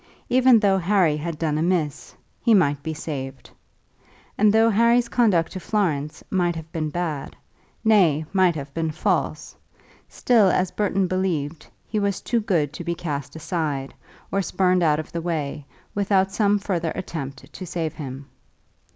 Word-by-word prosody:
Even 255 Hz, -2 st, +6 dB
though 195 Hz, -2 st, +3 dB
Harry 180 Hz, -4 st, +3 dB
had 155 Hz, +1 st, -4 dB
done 155 Hz, -1 st, -1 dB
amiss, 165 Hz, -4 st, -1 dB, 0.3 s
he 230 Hz, -2 st, +4 dB
might 145 Hz, -7 st, +2 dB
be 160 Hz, +2 st, -4 dB
saved. 135 Hz, -4 st, -6 dB, 0.8 s
And 210 Hz, 0 st, +4 dB
though 225 Hz, +1 st, +4 dB
Harry's 235 Hz, +3 st, +3 dB
conduct 210 Hz, -10 st, +2 dB
to 190 Hz, -, -5 dB
Florence 160 Hz, -7 st, -1 dB
might 175 Hz, -3 st, +1 dB
have 160 Hz, 0 st, -8 dB
been 155 Hz, -2 st, -2 dB
bad, 155 Hz, -3 st, -4 dB, 0.5 s
nay, 175 Hz, -9 st, +4 dB
might 185 Hz, -3 st, +3 dB
have 140 Hz, -2 st, -7 dB
been 165 Hz, 0 st, -1 dB
false, 155 Hz, -, -1 dB, 0.5 s
still, 230 Hz, -5 st, +3 dB
as 185 Hz, 0 st, +1 dB
Burton 195 Hz, -2 st, 0 dB
believed, 170 Hz, -5 st, -2 dB, 0.2 s
he 215 Hz, -, -1 dB
was 200 Hz, -1 st, 0 dB
too 235 Hz, -, 0 dB
good 160 Hz, -9 st, 0 dB
to 175 Hz, -, -6 dB
be 170 Hz, 0 st, -2 dB
cast 145 Hz, -4 st, -5 dB
aside, 155 Hz, -5 st, -3 dB, 0.4 s
or 195 Hz, -, +1 dB
spurned 185 Hz, 0 st, +1 dB
out 155 Hz, -2 st, +3 dB
of 155 Hz, -, -7 dB
the 170 Hz, -, -3 dB
way, 150 Hz, -4 st, -3 dB, 0.3 s
without 195 Hz, -1 st, +2 dB
some 205 Hz, 0 st, +2 dB
further 175 Hz, -5 st, -2 dB
attempt 140 Hz, -6 st, -6 dB
to 185 Hz, -, -7 dB
save 165 Hz, -3 st, -3 dB
him. 135 Hz, -3 st, -7 dB
170 Hz, 160 wpm, -23 LUFS, 150-195 Hz, 0.8 s, Even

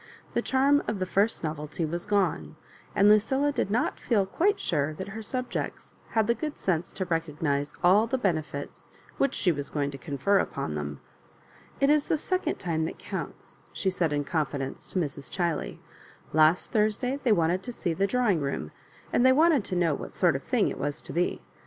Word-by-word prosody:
The -, -, +1 dB
charm 280 Hz, +2 st, +3 dB
of 215 Hz, -, -1 dB
the 185 Hz, -, -1 dB
first 200 Hz, +3 st, +1 dB
novelty 155 Hz, +1 st, -3 dB
was 170 Hz, +2 st, -4 dB
gone, 180 Hz, -, 0 dB, 0.4 s
and 200 Hz, -, +5 dB
Lucilla 265 Hz, +7 st, +4 dB
did 280 Hz, -, -1 dB
not 225 Hz, +4 st, 0 dB
feel 210 Hz, -6 st, +2 dB
quite 375 Hz, -, +1 dB
sure 155 Hz, -2 st, 0 dB
that 190 Hz, +4 st, -6 dB
her 220 Hz, +3 st, -6 dB
subjects 255 Hz, +3 st, -4 dB, 0.2 s
had 220 Hz, -1 st, +3 dB
the 235 Hz, -, +3 dB
good 300 Hz, +4 st, -5 dB
sense 175 Hz, -3 st, -1 dB
to 190 Hz, -, -2 dB
recognise 150 Hz, -4 st, -1 dB
all 200 Hz, +6 st, +5 dB
the 265 Hz, -, 0 dB
benefits 160 Hz, -, -3 dB, 0.3 s
which 275 Hz, -1 st, +2 dB
she 180 Hz, -, +3 dB
was 145 Hz, -3 st, -4 dB
going 145 Hz, -1 st, -1 dB
to 135 Hz, -, -9 dB
confer 175 Hz, +7 st, +1 dB
upon 75 Hz, -, -2 dB
them. 75 Hz, -1 st, -5 dB, 0.4 s
*' -, -, -27 dB
It 275 Hz, +1 st, +4 dB
is 300 Hz, -1 st, +3 dB
the 315 Hz, -, +2 dB
second 370 Hz, +5 st, -1 dB
time 160 Hz, -3 st, -1 dB
that -, -, -5 dB
counts," -, -, -7 dB
she 190 Hz, -, 0 dB
said 170 Hz, -4 st, 0 dB
in 145 Hz, 0 st, 0 dB
confidence 140 Hz, -3 st, -3 dB
to -, -, -5 dB
Mrs. 145 Hz, -4 st, -4 dB
Chiley. 170 Hz, -4 st, -2 dB, 0.3 s
" -, -, -25 dB
Last 155 Hz, +3 st, +4 dB
Thursday 230 Hz, +5 st, +1 dB
they 250 Hz, -, +2 dB
wanted 175 Hz, -1 st, +2 dB
to 245 Hz, -, -6 dB
see 175 Hz, -7 st, -2 dB
the 195 Hz, +4 st, +1 dB
drawing 215 Hz, -8 st, +2 dB
room, 140 Hz, -, -3 dB, 0.4 s
and 245 Hz, -, +4 dB
they 260 Hz, -, +7 dB
wanted 305 Hz, -2 st, +4 dB
to 185 Hz, -, -3 dB
know 170 Hz, -3 st, +2 dB
what -, -, -6 dB
sort -, -, +3 dB
of -, -, -2 dB
thing -, -, +1 dB
it -, -, -4 dB
was 145 Hz, 0 st, -2 dB
to -, -, -7 dB
be. 175 Hz, +1 st, 0 dB
185 Hz, 200 wpm, -27 LUFS, 155-230 Hz, 0.4 s, they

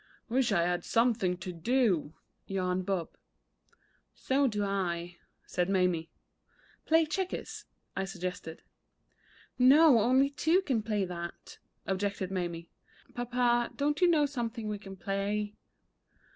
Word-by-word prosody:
"Wish 245 Hz, 0 st, +2 dB
I 170 Hz, -4 st, +3 dB
had 175 Hz, 0 st, 0 dB
something 225 Hz, -6 st, +1 dB
to 180 Hz, 0 st, -6 dB
do," 180 Hz, -, +1 dB, 0.3 s
yawned 185 Hz, -1 st, -1 dB
Bob. 185 Hz, -4 st, -1 dB, 1.1 s
"So 275 Hz, +1 st, +1 dB
do 210 Hz, -4 st, -1 dB
I," 175 Hz, -3 st, -2 dB, 0.3 s
said 180 Hz, +1 st, -1 dB
Mamie. 180 Hz, -4 st, +1 dB, 0.8 s
"Play 325 Hz, 0 st, +5 dB
checkers," 370 Hz, +4 st, -4 dB, 0.3 s
I 195 Hz, -, -1 dB
suggested. 180 Hz, -3 st, -6 dB, 1.0 s
"No; 275 Hz, +1 st, +7 dB
only 260 Hz, +5 st, +3 dB
two 325 Hz, +6 st, +2 dB
can 255 Hz, -10 st, 0 dB
play 210 Hz, -2 st, -1 dB
that," 170 Hz, -1 st, -8 dB, 0.3 s
objected 195 Hz, -1 st, -2 dB
Mamie. 170 Hz, -3 st, -4 dB, 0.4 s
"Papa, 240 Hz, 0 st, +1 dB
don't 295 Hz, +2 st, 0 dB
you 360 Hz, -, +6 dB
know 315 Hz, -4 st, +4 dB
something 235 Hz, -5 st, -4 dB
we 210 Hz, -1 st, -3 dB
can 195 Hz, -1 st, -10 dB
play?" 205 Hz, +2 st, -2 dB
205 Hz, 120 wpm, -30 LUFS, 180-250 Hz, 1.1 s, No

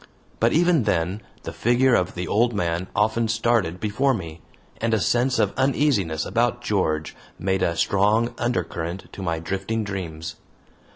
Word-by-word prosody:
But 115 Hz, +1 st, +3 dB
even 170 Hz, -6 st, +3 dB
then 95 Hz, +1 st, 0 dB, 0.2 s
the -, -, -6 dB
figure 120 Hz, +2 st, +3 dB
of 90 Hz, -5 st, +1 dB
the 90 Hz, -1 st, -3 dB
old 115 Hz, +4 st, +2 dB
man 85 Hz, -2 st, -1 dB
often 110 Hz, +2 st, +2 dB
started 115 Hz, -6 st, +1 dB
before 115 Hz, +6 st, +1 dB
me, 80 Hz, -5 st, -7 dB, 0.4 s
and 115 Hz, 0 st, +1 dB
a -, -, +1 dB
sense 125 Hz, +5 st, +2 dB
of -, -, +1 dB
uneasiness 130 Hz, -, +1 dB
about 120 Hz, +1 st, +1 dB
George 80 Hz, -9 st, -1 dB, 0.2 s
made 95 Hz, 0 st, 0 dB
a 85 Hz, -2 st, 0 dB
strong 105 Hz, +7 st, +2 dB
undercurrent 95 Hz, -7 st, -3 dB
to -, -, -8 dB
my 85 Hz, -3 st, -1 dB
drifting 95 Hz, +7 st, -2 dB
dreams. 85 Hz, -5 st, -5 dB
105 Hz, 155 wpm, -24 LUFS, 85-120 Hz, 0.4 s, But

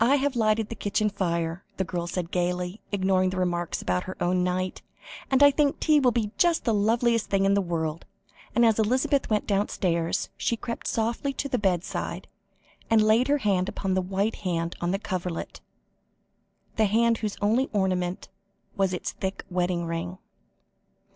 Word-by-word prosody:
"I 260 Hz, +5 st, +5 dB
have 280 Hz, -1 st, 0 dB
lighted 220 Hz, -1 st, +1 dB
the 230 Hz, -, -5 dB
kitchen 210 Hz, +1 st, 0 dB
fire," 170 Hz, -2 st, -2 dB
the 190 Hz, -, +1 dB
girl 175 Hz, -1 st, -3 dB
said 175 Hz, -1 st, -3 dB
gaily, 180 Hz, +2 st, -1 dB
ignoring 190 Hz, -2 st, +2 dB
the 185 Hz, -, -4 dB
remarks 175 Hz, -2 st, -1 dB
about 90 Hz, 0 st, 0 dB
her 185 Hz, -, -7 dB
own 180 Hz, +1 st, +1 dB
night, 185 Hz, +1 st, -2 dB, 0.5 s
"and 270 Hz, +1 st, +4 dB
I 285 Hz, -, +8 dB
think 285 Hz, 0 st, +1 dB
tea 305 Hz, -2 st, +4 dB
will 260 Hz, -3 st, +4 dB
be 225 Hz, -3 st, -1 dB
just 345 Hz, -2 st, +3 dB
the 230 Hz, -, +2 dB
loveliest 230 Hz, +2 st, +2 dB
thing 195 Hz, -1 st, +2 dB
in 195 Hz, -, +4 dB
the 200 Hz, -, +3 dB
world," 165 Hz, -3 st, -3 dB, 0.5 s
and 235 Hz, -, +5 dB
as 225 Hz, -1 st, +3 dB
Elizabeth 255 Hz, +5 st, +1 dB
went 215 Hz, -1 st, +1 dB
downstairs, 180 Hz, -4 st, 0 dB
she 235 Hz, -, 0 dB
crept 235 Hz, +1 st, -5 dB
softly 235 Hz, +5 st, -1 dB
to 280 Hz, -, -3 dB
the 255 Hz, -2 st, -1 dB
bedside, 185 Hz, -3 st, -2 dB, 0.6 s
and 225 Hz, -1 st, +5 dB
laid 220 Hz, +4 st, +4 dB
her 290 Hz, +1 st, +3 dB
hand 195 Hz, -7 st, +1 dB
upon 195 Hz, -1 st, -2 dB
the 185 Hz, -, +2 dB
white 195 Hz, +4 st, -1 dB
hand 170 Hz, -3 st, -2 dB
on 175 Hz, -, 0 dB
the 195 Hz, -, +1 dB
coverlet, 180 Hz, -4 st, -4 dB, 1.2 s
the 220 Hz, -, +4 dB
hand 230 Hz, +2 st, +2 dB
whose 210 Hz, -2 st, -3 dB
only 225 Hz, +6 st, +2 dB
ornament 185 Hz, -3 st, -1 dB, 0.5 s
was 190 Hz, -2 st, +1 dB
its -, -, -4 dB
thick 190 Hz, 0 st, -5 dB
wedding 175 Hz, -1 st, 0 dB
ring. 165 Hz, +2 st, -4 dB
195 Hz, 175 wpm, -26 LUFS, 180-230 Hz, 1.2 s, I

